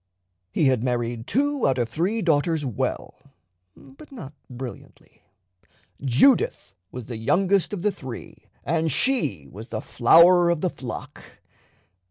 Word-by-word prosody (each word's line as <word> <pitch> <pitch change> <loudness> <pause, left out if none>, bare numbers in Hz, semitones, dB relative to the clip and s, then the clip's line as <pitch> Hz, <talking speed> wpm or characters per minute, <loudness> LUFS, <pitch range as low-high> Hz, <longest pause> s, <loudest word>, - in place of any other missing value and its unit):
He 155 - +1
had 130 -4 +2
married 120 -2 -2
two 285 0 +1
out 135 -1 +1
of 120 -2 0
three 185 - -1
daughters 160 -1 +1
well, 125 -6 -4 0.6
but 135 - -16
not 160 - -9 0.2
brilliantly. 125 -1 -10 0.8
Judith 140 - +2 0.2
was 125 -2 -7
the 115 -1 -7
youngest 185 - +1
of 195 -4 -5
the 210 - +2
three, 130 -9 -10 0.2
and 160 0 0
she 130 - -1
was 110 +4 -10
the 110 -3 -4
flower 170 +10 +5
of 170 -3 0
the 185 - 0
flock. 125 -4 -8
145 Hz, 135 wpm, -24 LUFS, 120-185 Hz, 0.8 s, flower